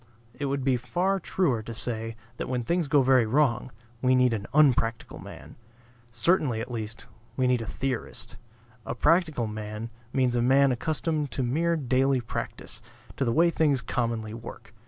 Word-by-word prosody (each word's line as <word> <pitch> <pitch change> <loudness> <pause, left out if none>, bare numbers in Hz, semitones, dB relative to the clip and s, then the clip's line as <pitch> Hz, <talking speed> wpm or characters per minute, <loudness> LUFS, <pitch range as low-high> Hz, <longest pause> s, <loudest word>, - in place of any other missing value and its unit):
It 145 - -4
would 140 -1 -1
be 130 -1 +2
far 180 +10 0
truer 160 -10 0
to 115 +1 -7
say, 115 0 0 0.2
that - - -4
when 125 -1 -1
things 170 +4 0
go 145 -1 +4
very 130 -3 +4
wrong 130 -1 +2 0.3
we 130 0 +4
need 125 -2 +4
an 105 -3 -3
unpractical 125 -6 +2
man. - - -11 0.5
Certainly, 125 -1 +2
at 115 - -5
least, 110 -1 -5 0.3
we 130 - +2
need 125 -1 +2
a 115 - -6
theorist. 130 0 -4 0.5
A - - -4
practical 155 -3 +2
man 105 +1 -6 0.2
means 130 -2 +1
a 120 - +2
man 135 +2 +4
accustomed 155 +3 -1
to 130 - -2
mere 165 +8 +1
daily 135 -2 +2
practice, 120 - -5 0.3
to - - -1
the 120 - +1
way 170 +7 +4
things 150 -5 +2
commonly 115 -3 -2
work. 115 0 -10
130 Hz, 170 wpm, -27 LUFS, 115-145 Hz, 0.5 s, go